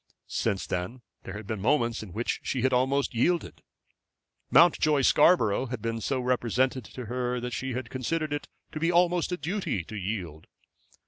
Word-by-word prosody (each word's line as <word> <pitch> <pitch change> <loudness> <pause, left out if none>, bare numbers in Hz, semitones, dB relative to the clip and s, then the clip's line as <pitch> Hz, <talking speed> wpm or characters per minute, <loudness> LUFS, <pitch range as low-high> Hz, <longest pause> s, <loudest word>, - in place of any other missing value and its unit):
Since 95 - -1
that 90 +1 -2 0.4
there 95 - -6
had 105 0 -7
been 105 -1 -4
moments 120 -1 +1
in 105 -4 -9
which 115 +6 -2
she 125 -3 -2
had 130 0 +2
almost 135 +3 +1
yielded. 170 +9 0 0.9
Mountjoy 155 -4 +5
Scarborough 130 - +4
had 125 -1 -4
been 115 0 -3
so 135 +2 -1
represented 125 0 0
to 125 +2 -8
her 125 +2 -2
that 125 0 -5
she 130 +1 -3
had 125 -1 -5
considered 155 +4 -2
it 145 - -4 0.2
to 155 - -5
be 165 +2 +2
almost 175 0 +2
a 180 - -1
duty 170 - -2
to 110 - -9
yield. 90 -6 -5
125 Hz, 175 wpm, -28 LUFS, 110-145 Hz, 0.9 s, Mountjoy